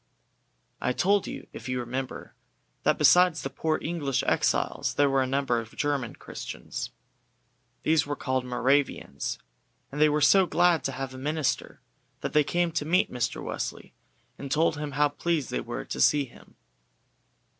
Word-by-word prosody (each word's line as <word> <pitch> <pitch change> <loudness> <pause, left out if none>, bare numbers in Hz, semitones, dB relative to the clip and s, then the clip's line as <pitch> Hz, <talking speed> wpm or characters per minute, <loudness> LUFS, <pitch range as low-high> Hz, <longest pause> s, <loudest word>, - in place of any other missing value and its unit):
I 125 - +1
told 200 +7 +2
you, - - -7
if - - -8
you 125 0 -1
remember, 125 +2 -5 0.5
that - - +2
besides 180 -4 +5
the 135 - -4
poor 155 -1 0
English 145 -6 -1
exiles - - +1
there 145 -1 +3
were 135 0 +3
a 130 - 0
number 135 -2 +1
of 115 -1 -9
German 145 -5 -1
Christians. - - -6 0.9
These 155 -2 +3
were 145 - -2
called 130 -2 -1
Moravians, 130 +3 0 0.5
and 145 +2 -3
they 155 - +7
were 150 +1 +1
so 185 +5 +5
glad 175 -3 +3
to 135 - -1
have 130 0 -5
a 130 - -8
minister 145 -2 -2 0.4
that - - -3
they 150 0 +5
came 175 +3 0
to 160 -2 -1
meet 170 +5 +2
Mr. 125 -2 -2
Wesley, - - -5 0.5
and 140 - -6
told 160 +1 +3
him 145 -1 -5
how 145 +2 +3
pleased 155 0 -2
they 60 - -1
were - - -5
to 65 - -4
see 145 - +4
him. 120 - -18
145 Hz, 165 wpm, -27 LUFS, 130-160 Hz, 0.9 s, they